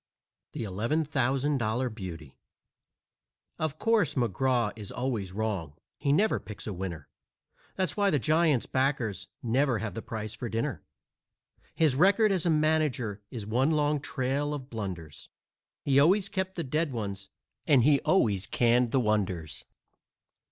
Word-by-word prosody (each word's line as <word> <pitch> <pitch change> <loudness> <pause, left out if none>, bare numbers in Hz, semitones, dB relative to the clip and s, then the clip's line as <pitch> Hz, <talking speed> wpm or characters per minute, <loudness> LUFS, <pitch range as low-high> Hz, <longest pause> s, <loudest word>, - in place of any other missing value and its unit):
THE - - -4
$11,000 130 +1 0
BEAUTY 85 - -8 1.2
Of 155 -1 -2
course, 225 - +2
McGraw 120 0 +1
is 105 -3 -8
always 120 -7 -2
wrong 100 -7 -3 0.3
he 140 - +1
never 205 +9 +3
picks 105 - -9
a 105 - -4
winner. 85 -5 -5 0.7
That's 185 -1 -1
why 205 -1 +3
the 150 - +2
Giant's 155 -1 +2
backers 130 -6 -1 0.2
never 125 +1 +2
have 115 -2 -4
the 115 - -5
price 110 -1 -5
for 120 +1 -5
dinner. 115 +1 -2 0.9
His 155 -5 +3
record 200 +7 +4
as 180 -3 0
a - - +3
manager 150 -9 +1
is 115 -5 -6
one 125 +7 +1
long 150 -1 +2
trail 140 +1 -1
of 135 -1 -9
blunders 90 -9 -6 0.5
He 140 -1 +4
always 190 +7 +4
kept 190 0 -2
the 170 - -2
dead 150 +2 -1
ones 100 -4 -5 0.4
and 135 -5 +5
he 140 +1 +5
always 105 - +2
canned 120 0 +3
the 135 - +2
wonders. 95 - -1
125 Hz, 140 wpm, -29 LUFS, 105-150 Hz, 1.2 s, and